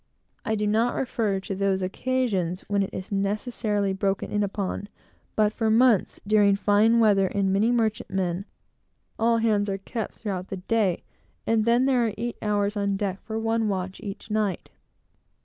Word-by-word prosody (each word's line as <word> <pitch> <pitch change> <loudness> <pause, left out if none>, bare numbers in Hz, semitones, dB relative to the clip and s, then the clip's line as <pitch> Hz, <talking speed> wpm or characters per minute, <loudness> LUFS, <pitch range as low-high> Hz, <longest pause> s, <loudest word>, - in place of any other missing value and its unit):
I 220 - 0
do 210 0 -1
not 225 +3 +2
refer 220 -6 -1
to 195 - -5
those 190 -1 0
occasions 195 -4 -1
when 200 -1 -1
it 195 - -1
is 185 - -7
necessarily 205 0 -1
broken 195 0 -1
in 205 - +1
upon; 200 0 -3 0.5
but, 210 -1 +2
for 225 -1 0
months, 225 -2 +3
during 205 -1 +4
fine 210 +3 +3
weather, 200 -4 +4
in 195 0 0
many 210 +5 +3
merchantmen, 195 -5 -1 0.7
all 230 +1 +3
hands 210 -3 +1
are 195 - -1
kept, 220 +3 -5
throughout 190 -4 -4
the 195 - -5
day, 195 -1 0 0.4
and, 225 -1 +2
then, 240 +2 +3
there 250 -3 +3
are 215 - -3
eight 235 +1 -3
hours 205 0 0
on 200 -1 0
deck 195 -1 -3
for 220 0 -5
one 225 0 0
watch 190 -1 -3
each 200 +2 -7
night. 210 -4 -1
205 Hz, 165 wpm, -25 LUFS, 195-225 Hz, 0.7 s, during